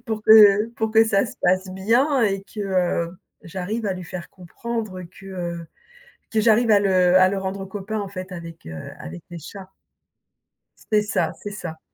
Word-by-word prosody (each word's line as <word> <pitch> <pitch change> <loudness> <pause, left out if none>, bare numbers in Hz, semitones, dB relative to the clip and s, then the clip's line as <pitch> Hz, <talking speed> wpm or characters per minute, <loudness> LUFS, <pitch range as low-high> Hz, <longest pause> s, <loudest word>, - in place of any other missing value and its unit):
pour 220 -1 -3
que 210 -1 +8
pour 220 -1 -1
que 225 +1 +6
ça 200 -1 +2
se - - -10
passe 185 +1 +2
bien 235 +9 +2
et 195 -3 +1
que, 205 - -14
heu, 180 -3 0 0.3
j'arrive 195 +6 -4
à 195 - 0
lui 185 0 -6
faire 175 0 -7
comprendre 200 +1 -6
que, 180 +2 -14
heu, 175 -3 -5 0.7
que 220 - +2
j'arrive 225 +1 +4
à 205 -1 +6
le 185 -2 +4
à 185 0 +6
le 195 - -2
rendre 190 0 -4
copain 205 +2 -5
en 200 - -4
fait 185 -1 -7
avec, 165 -2 -9
heu, 80 -1 -7
avec 80 +2 -9
les 175 - -7
chats. 190 +4 -11 1.2
C'est 210 0 +4
ça, 210 - -1
c'est 205 - -6
ça. 170 -6 -7
195 Hz, 185 wpm, -23 LUFS, 180-215 Hz, 1.2 s, que